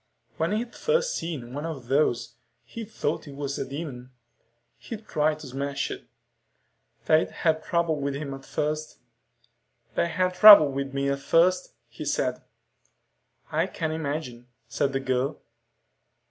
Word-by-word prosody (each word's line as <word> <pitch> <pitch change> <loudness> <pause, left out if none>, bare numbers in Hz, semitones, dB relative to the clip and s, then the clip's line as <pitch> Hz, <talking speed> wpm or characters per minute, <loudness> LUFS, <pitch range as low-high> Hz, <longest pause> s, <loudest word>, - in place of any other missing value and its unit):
When 165 +3 0
he'd 235 +2 -2
first 485 +1 0
seen 140 -8 -5
one 145 +2 -4
of 155 -7 -5
those, 120 -4 +1 0.3
he'd 225 -2 -8
thought 215 - -3
it 140 - -9
was 140 -1 -4
a - - -2
demon. 135 -4 -6 0.7
He'd 225 -2 -8
tried 155 0 +1
to - - -9
smash 140 +2 -3
it. - - -8 1.0
They'd 155 0 +3
had 160 -2 0
trouble 170 -4 0
with 140 0 -2
him 140 -1 -5
at 135 0 -9
first. 155 +2 -3 1.0
"They - - +1
had 180 +2 0
trouble 200 -7 +10
with 135 0 -3
me 140 0 0
at 140 0 -1
first," 180 - +2
he - - -9
said. - - -1 1.1
"I - - +1
can 160 -2 -3
imagine," 145 -6 -4 0.2
said 140 - 0
the 135 - -1
girl. 130 +2 -1
150 Hz, 145 wpm, -26 LUFS, 140-170 Hz, 1.1 s, trouble